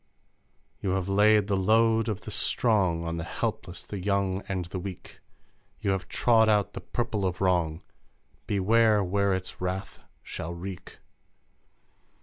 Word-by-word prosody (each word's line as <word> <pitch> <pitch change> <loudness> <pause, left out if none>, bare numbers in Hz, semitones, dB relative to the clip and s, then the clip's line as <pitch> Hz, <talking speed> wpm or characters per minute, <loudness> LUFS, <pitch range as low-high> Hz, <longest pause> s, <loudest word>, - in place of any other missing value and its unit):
You 95 -2 -1
have 95 -1 -1
laid 105 +1 +4
the 100 -1 0
load 110 +3 +3
of 105 -1 -3
the - - -8
strong 95 -8 +1
On 85 0 -3
the 80 - -3
helpless, 90 +2 -4
the 100 - -6
young, 100 0 0 0.3
the 95 - -3
weak! 95 0 -8 0.6
You 100 - 0
have 95 -2 -2
trod 110 -2 +3
out 105 -2 +2
the - - -6
purple 110 -4 -2
of 90 -1 -1
wrong; 85 -4 +1 0.6
Beware 105 +1 +3
where 100 +2 +1
its 95 -1 -4
wrath 90 +1 -4 0.2
shall 85 +2 -6
wreak! 90 +1 -8
95 Hz, 140 wpm, -27 LUFS, 90-105 Hz, 0.6 s, laid